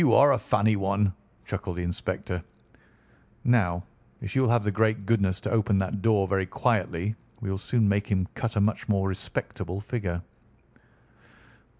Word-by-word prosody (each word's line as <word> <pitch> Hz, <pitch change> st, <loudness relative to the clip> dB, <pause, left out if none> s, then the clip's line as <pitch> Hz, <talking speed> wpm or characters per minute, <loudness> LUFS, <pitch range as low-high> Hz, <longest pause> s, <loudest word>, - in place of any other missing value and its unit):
You 140 Hz, -8 st, +5 dB
are 145 Hz, +1 st, +7 dB
a -, -, +3 dB
funny 105 Hz, +1 st, +2 dB
one," 100 Hz, 0 st, +1 dB, 0.3 s
chuckled 100 Hz, 0 st, -4 dB
the 90 Hz, -, -2 dB
inspector. 90 Hz, 0 st, -3 dB, 1.0 s
"Now, 90 Hz, -8 st, +2 dB, 0.4 s
if -, -, -6 dB
you 130 Hz, -, +4 dB
will 130 Hz, -, +3 dB
have 120 Hz, -2 st, +3 dB
the 105 Hz, -, +1 dB
great 110 Hz, 0 st, +1 dB
goodness 100 Hz, -4 st, +2 dB
to -, -, -3 dB
open 110 Hz, -3 st, +2 dB
that 95 Hz, +1 st, -1 dB
door 105 Hz, -3 st, +3 dB
very 95 Hz, -1 st, 0 dB
quietly, 100 Hz, -2 st, 0 dB, 0.2 s
we 100 Hz, -5 st, -3 dB
will 95 Hz, -, -2 dB
soon 110 Hz, +1 st, +1 dB
make 100 Hz, +1 st, +1 dB
him 95 Hz, -3 st, +1 dB
cut 115 Hz, -2 st, -3 dB
a 105 Hz, -, +3 dB
much 105 Hz, +2 st, 0 dB
more 95 Hz, -2 st, +2 dB
respectable 95 Hz, -1 st, -4 dB
figure." 100 Hz, -5 st, -3 dB
100 Hz, 170 wpm, -27 LUFS, 95-110 Hz, 1.0 s, are